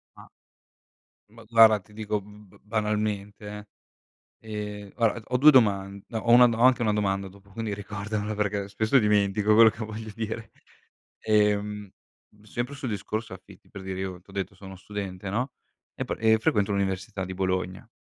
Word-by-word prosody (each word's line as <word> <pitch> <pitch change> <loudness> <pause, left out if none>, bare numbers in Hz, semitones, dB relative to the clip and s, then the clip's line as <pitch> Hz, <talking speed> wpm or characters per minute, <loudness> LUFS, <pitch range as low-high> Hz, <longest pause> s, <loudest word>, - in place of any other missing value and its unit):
Ah. - - -14 1.0
Ma 115 +1 -15
guarda, 110 -1 +6
ti 105 - -23
dico 105 -1 -2
b 105 -1 -16
banalmente, 105 -1 -2
eh. 105 0 -8 0.8
Ehm, 105 -1 -5
guarda 115 -1 +1
d - - -15
ho 125 - +1
2 150 +4 +8
doman 100 -6 +3
no, 115 - -3
ho 115 - +1
1 125 0 +8
do 115 -1 -1
ho - - -2
anche 125 -1 +5
1 105 -1 +2
domanda 100 -2 0
dopo, 100 +1 -17
quindi 110 0 -4
ricordamela 105 +1 -4
perché 105 -1 -1
spesso 110 +6 +2
dimentico 105 0 +3
quello 115 0 +8
che 110 - -6
voglio 110 0 -7
dire. 110 0 -5 0.7
Ehm, 105 -1 +1 0.5
sempre 120 +6 -4
sul 135 -3 -4
discorso 105 +1 -4
affitti 95 0 -15
per 100 - -9
dire, 95 0 -5
io 95 -2 -5
t'ho 100 - -19
detto 95 0 -4
sono 95 0 -11
uno 95 - -10
studente 100 -2 -6
no, 125 +4 -2 0.4
e - - -3
pe - - -3
e 110 0 +4
frequento 105 -2 +1
l'università 95 0 -2
di 95 - -6
Bologna. 95 +1 -2
105 Hz, 175 wpm, -26 LUFS, 100-110 Hz, 1.0 s, 2